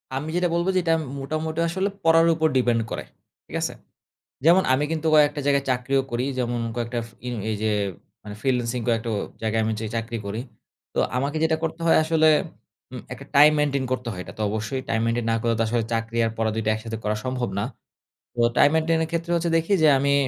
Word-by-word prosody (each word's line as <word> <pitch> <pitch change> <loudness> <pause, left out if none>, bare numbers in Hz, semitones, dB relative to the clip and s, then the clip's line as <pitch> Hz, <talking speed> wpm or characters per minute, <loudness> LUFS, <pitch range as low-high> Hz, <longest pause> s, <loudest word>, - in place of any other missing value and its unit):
আমি 145 +4 -3
যেটা 180 0 +2
বলব 170 +1 0
যে, - - +4
এটা 165 -1 +2
আম - - -3 0.2
মোটামুটি 155 +3 -3
আসলে 190 +4 -1
পড়ার 165 0 +5
উপর 160 0 +2
depend 120 -2 +2
করে। - - -3 0.4
ঠিক - - -8
আছে? - - -1 0.7
যেমন 175 +4 +6
আমি 135 +3 +2
কিন্তু 160 0 -2
কয়েকটা 150 -1 +4
জায়গায় 140 -1 +2
চাকরিও 130 +2 +1
করি। 120 +1 -1
যেমন 120 -1 -1 0.2
কয়েকটা 120 0 -2
ফিং 120 +1 -7 0.2
এইযে 110 0 -1 0.5
মানে 105 - -8
ফ্রিল্যান্সিং 125 -2 0
কয়েকটা 115 0 0
ও - - 0 0.2
জায়গায় 110 0 +1
আমি 110 - 0
যেই 110 -2 -4
চাকরি 115 0 -3
করি। 105 +3 -3 0.5
তো - - -4 0.2
আমাকে 140 +4 -1
যেটা 160 0 +3
করতে 165 0 -3
হয় 165 - +5
আসলে 160 0 +3 0.6
উম - - -6
একটা - - -8
টাইম 150 +2 +9
মেইনটেইন 140 -2 +1
করতে 125 -2 -3
হয়, 90 - -6
এটা - - -10
তো - - -2
অবশ্যই 110 +5 -3
টাইম 110 - +1
মেইনটেইন 115 0 0
না - - +2
করলে 115 0 +1
আসলে 115 0 0
চাকরি 115 0 -2
আর - - -1
পড়া 110 0 0
দুইটা 110 -1 0
একসাথে 115 0 -5
করা 105 0 0
সম্ভব 125 -2 -2
না। 100 - 0 0.7
তো 120 - -8 0.2
টাইম 145 - +7
মেইনটেইন 160 0 +2
এর 160 - -4
ক্ষেত্রে 170 +1 -2
হচ্ছে 170 0 0
দেখি 165 +5 0
যে 155 - +7
আমি 140 +1 +2
130 Hz, 210 wpm, -24 LUFS, 115-160 Hz, 0.7 s, টাইম